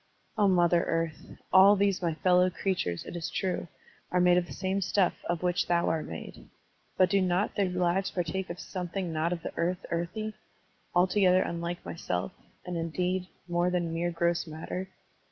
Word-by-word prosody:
O 210 Hz, -2 st, +3 dB
Mother 175 Hz, -2 st, +4 dB
Earth! 165 Hz, -1 st, -2 dB, 0.2 s
All 195 Hz, +2 st, +8 dB
these 200 Hz, -1 st, +1 dB
my 170 Hz, -3 st, 0 dB
fellow 180 Hz, +2 st, +4 dB
crea 190 Hz, +2 st, -1 dB
tures, 90 Hz, -, -3 dB
it -, -, -7 dB
is 170 Hz, -2 st, -3 dB
true, 185 Hz, -2 st, -2 dB, 0.4 s
are 180 Hz, -, +2 dB
made 180 Hz, 0 st, +5 dB
of 180 Hz, -1 st, +1 dB
the -, -, -11 dB
same 190 Hz, +1 st, -1 dB
stuff 190 Hz, 0 st, +2 dB, 0.2 s
of 175 Hz, 0 st, -1 dB
which 180 Hz, 0 st, +1 dB
thou 170 Hz, -1 st, +2 dB
art 160 Hz, -1 st, -1 dB
made. 80 Hz, -, -9 dB, 0.5 s
But 185 Hz, -, +4 dB
do 200 Hz, -1 st, +4 dB
not 185 Hz, +2 st, +1 dB
their 195 Hz, -2 st, +1 dB
lives 180 Hz, +2 st, +1 dB
partake 185 Hz, +2 st, -3 dB
of 170 Hz, +1 st, -6 dB
something 180 Hz, -2 st, -4 dB
not 160 Hz, +2 st, 0 dB
of 170 Hz, -2 st, -3 dB
the -, -, -5 dB
earth 180 Hz, +3 st, -1 dB
earthy, 175 Hz, +6 st, -2 dB, 0.6 s
altogether 185 Hz, +1 st, +4 dB
tmUke 170 Hz, +1 st, -4 dB
thyself, 90 Hz, -, -3 dB, 0.3 s
and, 180 Hz, -1 st, -3 dB
indeed, 180 Hz, +3 st, -1 dB, 0.2 s
more 175 Hz, +1 st, +1 dB
than 175 Hz, -2 st, -1 dB
mere 170 Hz, +1 st, 0 dB
gross 170 Hz, 0 st, 0 dB
matter? 160 Hz, +4 st, -5 dB
180 Hz, 180 wpm, -29 LUFS, 170-185 Hz, 0.6 s, All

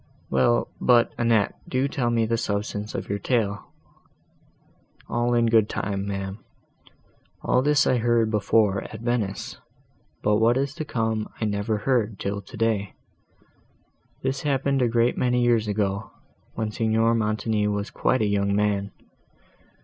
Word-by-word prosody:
"Well, 95 Hz, -, +2 dB
but, 120 Hz, -2 st, +4 dB
Annette, 115 Hz, -3 st, +2 dB, 0.2 s
do 130 Hz, +2 st, +1 dB
tell 135 Hz, -4 st, -1 dB
me 115 Hz, -1 st, +2 dB
the 115 Hz, +1 st, 0 dB
substance 105 Hz, -1 st, -3 dB
of -, -, -4 dB
your 100 Hz, 0 st, -2 dB
tale." 105 Hz, -2 st, -1 dB, 1.4 s
"All 120 Hz, +1 st, 0 dB
in 120 Hz, 0 st, +3 dB
good 110 Hz, -2 st, +3 dB
time, 100 Hz, -1 st, -3 dB
ma'am; 100 Hz, +1 st, -4 dB, 1.0 s
all 125 Hz, -, +2 dB
this 150 Hz, +1 st, +3 dB
I 130 Hz, -, +3 dB
heard 115 Hz, -1 st, +2 dB
before 105 Hz, -1 st, +2 dB
at 110 Hz, -, -9 dB
Venice, 115 Hz, -5 st, -2 dB, 0.6 s
but 105 Hz, 0 st, +3 dB
what 115 Hz, +3 st, +3 dB
is 140 Hz, +1 st, -1 dB
to 155 Hz, -, -5 dB
come 110 Hz, -4 st, -2 dB
I 110 Hz, -, -1 dB
never 105 Hz, +1 st, -1 dB
heard 110 Hz, -3 st, 0 dB
till 100 Hz, +1 st, -3 dB
today. 110 Hz, -1 st, -2 dB, 1.3 s
This 130 Hz, 0 st, -1 dB
happened 140 Hz, -1 st, 0 dB
a 125 Hz, -, +3 dB
great 120 Hz, +1 st, +1 dB
many 125 Hz, -1 st, +2 dB
years 115 Hz, -3 st, +2 dB
ago, 100 Hz, 0 st, -1 dB, 0.5 s
when 110 Hz, -1 st, -2 dB
Signor 115 Hz, +1 st, +2 dB
Montoni 110 Hz, -1 st, 0 dB
was 105 Hz, 0 st, -2 dB
quite 130 Hz, -3 st, +1 dB
a -, -, +2 dB
young 100 Hz, 0 st, +1 dB
man. 100 Hz, -1 st, 0 dB
110 Hz, 145 wpm, -24 LUFS, 105-120 Hz, 1.4 s, but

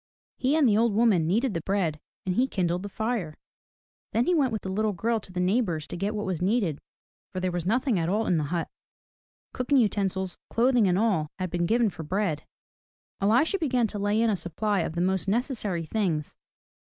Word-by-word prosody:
He 265 Hz, +3 st, +1 dB
and 295 Hz, -4 st, +5 dB
the 210 Hz, -, +4 dB
old 230 Hz, -3 st, +2 dB
woman 210 Hz, -8 st, +3 dB
kneaded 225 Hz, +6 st, +1 dB
the 165 Hz, -, -2 dB
bread, 175 Hz, -5 st, -1 dB, 0.3 s
and 185 Hz, -, 0 dB
he 250 Hz, +7 st, +2 dB
kindled 180 Hz, -6 st, -1 dB
the 205 Hz, -, -6 dB
fire. 220 Hz, -7 st, -3 dB, 0.8 s
Then 235 Hz, +2 st, +2 dB
he 360 Hz, -, +2 dB
went 280 Hz, -7 st, +2 dB
with 220 Hz, -, -3 dB
the 190 Hz, -, -4 dB
little 215 Hz, +2 st, 0 dB
girl 225 Hz, +5 st, 0 dB
to 195 Hz, -, -13 dB
the 180 Hz, -, -4 dB
neighbor's 180 Hz, -4 st, +1 dB
to -, -, -7 dB
get 200 Hz, +4 st, -2 dB
what 210 Hz, -, -2 dB
was 185 Hz, -4 st, -2 dB
needed, 190 Hz, -, +1 dB, 0.5 s
for 185 Hz, -, -4 dB
there 185 Hz, 0 st, -1 dB
was 175 Hz, -1 st, -3 dB
nothing 240 Hz, -1 st, +1 dB
at 165 Hz, 0 st, 0 dB
all 215 Hz, +4 st, +1 dB
in 175 Hz, -, +2 dB
the 150 Hz, -, -1 dB
hut, 170 Hz, +2 st, -2 dB, 0.5 s
— -, -, -61 dB
cooking 255 Hz, +3 st, +1 dB
utensils, 195 Hz, -5 st, 0 dB
clothing 240 Hz, -2 st, +3 dB
and 180 Hz, 0 st, +2 dB
all 195 Hz, -8 st, +1 dB
had 185 Hz, -2 st, -3 dB
been 175 Hz, -1 st, 0 dB
given 230 Hz, 0 st, +2 dB
for 165 Hz, -, -8 dB
bread. 165 Hz, -1 st, -2 dB, 0.7 s
Elisha 245 Hz, -, +3 dB
began 255 Hz, -7 st, +1 dB
to 205 Hz, -1 st, -4 dB
lay 205 Hz, +2 st, +1 dB
in 230 Hz, -1 st, +3 dB
a -, -, +1 dB
supply 200 Hz, +3 st, -1 dB
of 160 Hz, -, -2 dB
the 170 Hz, -, -1 dB
most 190 Hz, +1 st, 0 dB
necessary 210 Hz, -, -1 dB
things. 165 Hz, -5 st, -1 dB
200 Hz, 215 wpm, -27 LUFS, 175-230 Hz, 0.8 s, and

